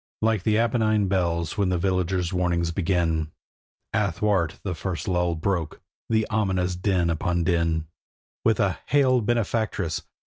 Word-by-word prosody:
Like 110 -3 +2
the 105 +3 +2
Apennine 110 -3 +2
bells 85 -2 -1
when 100 -2 +2
the 90 - +1
villagers' 90 0 0
warnings 85 -2 0
begin, 80 -3 0 0.6
Athwart 100 -4 0
the 95 - -2
first 85 +3 -4
lull 90 -2 +1
broke 85 -1 -2 0.3
the 110 -1 +2
ominous 95 -4 0
din 90 -2 +1
upon 85 +1 0
din; 85 -2 +1 0.6
With 110 -3 +2
a 95 -5 +1
'Hail, 130 -3 +3
benefactress! 110 -6 -1
90 Hz, 135 wpm, -25 LUFS, 85-105 Hz, 0.6 s, Hail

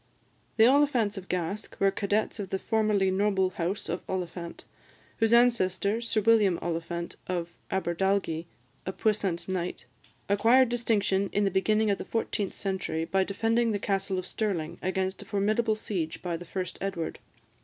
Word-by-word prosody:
The 220 - +7
Oliphants 255 -5 +3
of 190 -2 -8
Gask 180 +3 -3
were 195 0 +4
cadets 210 +2 -1
of 195 -2 -4
the 190 - -1
formerly 210 -2 +1
noble 190 -1 +2
house 185 +3 -3
of 175 - -2
Oliphant; 175 -2 -5 0.5
whose 225 -1 +2
ancestor, 225 -3 +3
Sir 230 -2 0
William 210 -5 +4
Oliphant 170 0 -4
of 175 -2 -2 0.2
Aberdalgie, 185 -2 0 0.4
a 190 - -2
puissant 200 -6 0
knight, 180 -8 -3 0.4
acquired 230 +6 +5
distinction 205 -5 +1
in 205 - +1
the 195 - +2
beginning 215 +2 +2
of 200 - -1
the - - -5
fourteenth 210 -3 -2
century 190 -4 -2
by 190 +2 +2
defending 225 +4 +1
the - - +1
Castle 195 -1 -1
of 185 - -3
Stirling 185 -9 -2
against 190 +1 -1
a - - -10
formidable 215 +3 +1
siege 175 -7 -4
by 175 -2 -2
the 175 +1 -7
first 180 0 -5
Edward. 185 -4 -3
195 Hz, 155 wpm, -28 LUFS, 185-215 Hz, 0.5 s, The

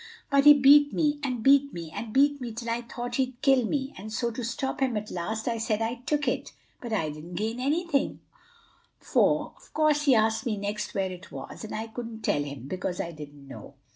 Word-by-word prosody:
"But 280 0 +4
he 295 0 +11
beat 285 +1 +7
me, 295 -2 +1
and 250 -5 -2
beat 280 +2 +5
me, 165 -2 -7
and 225 -1 -5
beat 285 +3 +3
me 240 -2 -4
till 230 +1 -4
I 235 +1 -1
thought 240 0 -5
he'd 260 -2 -1
kill 270 -4 +4
me; 275 +1 -2
and 210 +3 -8
so 235 +2 -1
to 240 +2 -5
stop 240 +4 -3
him 260 -4 +1
at 210 0 -5
last 220 +6 -3
I 230 -1 0
said 220 -1 0
I 230 +2 -2
took 295 -1 0
it. - - -2 0.3
But 240 - -6
I 160 -8 0
didn't 155 +4 -9
gain 220 +5 -2
anything, 290 +2 0 0.8
for - - +1
of - - -21
course 300 -1 +3
he 270 -4 +6
asked 220 +3 +2
next 210 -1 -3
where 190 -1 0
it 180 -2 -10
was, 135 +9 -8
and 215 - -6
I 220 +1 -3
couldn't 225 0 -7
tell 145 - +1
him, 140 -3 -6
because 180 +2 -3
I 170 - -3
didn't 145 -3 -11
know. 135 - -11
230 Hz, 220 wpm, -27 LUFS, 205-270 Hz, 0.8 s, he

